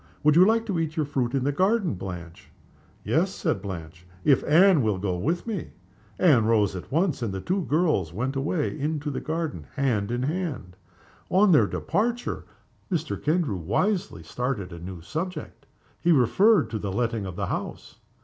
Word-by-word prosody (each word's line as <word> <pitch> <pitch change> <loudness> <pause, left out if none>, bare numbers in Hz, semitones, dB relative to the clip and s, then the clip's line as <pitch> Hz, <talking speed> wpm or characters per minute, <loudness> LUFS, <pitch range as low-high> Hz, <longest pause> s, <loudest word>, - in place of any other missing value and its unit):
"Would 150 0 +5
you 175 - +8
like 225 +3 +3
to 195 -6 -1
eat 160 -1 -2
your 155 - +1
fruit 135 -3 -1
in 135 - 0
the 145 - +1
garden, 190 - +1
Blanche?" 90 -3 -8 0.5
"Yes," - - +1
said 95 - -1
Blanche, 90 -3 -8 0.2
"if 135 -3 +4
Anne 175 +1 +6
will 110 -4 +1
go 95 -1 -2
with 160 - -1
me." 215 -7 -4 0.4
Anne 140 -12 +4
rose 105 -4 +2
at 90 - -8
once, 165 -1 +1
and 115 -4 -1
the 95 - -4
two 185 - -1
girls 150 - +1
went 125 +9 -3
away 150 +3 -1
together 150 - -7
into 150 -1 -1
the - - -4
garden, 155 - -3
hand 120 -8 0
in 120 +1 -1
hand. 145 - -3 0.5
On 195 +1 +4
their 150 - +5
departure 235 +6 -2 0.5
Mr. 165 -3 -1
Kendrew 155 - 0
wisely 120 - -1
started 105 -1 -3
a 85 - -8
new 90 0 -8
subject. 160 - -6 0.3
He 175 - +2
referred 180 - +4
to 110 - -2
the 100 -2 -3
letting 115 -1 -1
of 90 - -7
the - - -2
house. - - -5
140 Hz, 180 wpm, -26 LUFS, -, 0.5 s, you